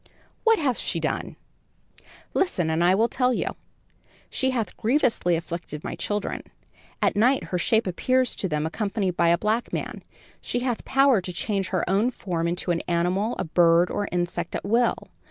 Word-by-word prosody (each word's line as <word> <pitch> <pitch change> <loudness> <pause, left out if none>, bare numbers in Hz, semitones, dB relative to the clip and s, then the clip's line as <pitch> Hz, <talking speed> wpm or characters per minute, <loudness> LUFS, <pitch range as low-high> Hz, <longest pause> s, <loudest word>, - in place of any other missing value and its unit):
"What 450 -1 +5
hath 270 - 0
she - - -1
done?" - - -3 1.0
"Listen 180 - +1
and 160 +2 +1
I 180 +2 +5
will 225 +4 +3
tell 250 0 +1
you. - - -2 0.8
She 260 - +1
hath 240 -4 -2
grievously 230 - +2
afflicted 170 -2 -5
my - - -4
children. 205 -1 -2 0.6
At - - +2
night 250 +6 +3
her 180 - +1
shape 220 +6 +2
appears 255 +7 +1
to 190 - -1
them 150 -1 -1
accompanied 195 +1 -2
by 170 -1 +3
a 170 - +4
black 215 +5 -1
man. - - -4 0.4
She 245 - -2
hath 245 -2 -2
power 270 -5 +4
to 180 - -5
change 195 +2 -1
her 185 -3 -1
own 200 +6 +2
form 175 -8 -3
into 175 +1 -1
an 170 - 0
animal, 180 +6 0
a - - -1
bird 170 +1 +4
or 205 - -2
insect 175 -1 -2
at - - -4
will. 230 +4 +3
195 Hz, 175 wpm, -25 LUFS, 175-240 Hz, 1.0 s, What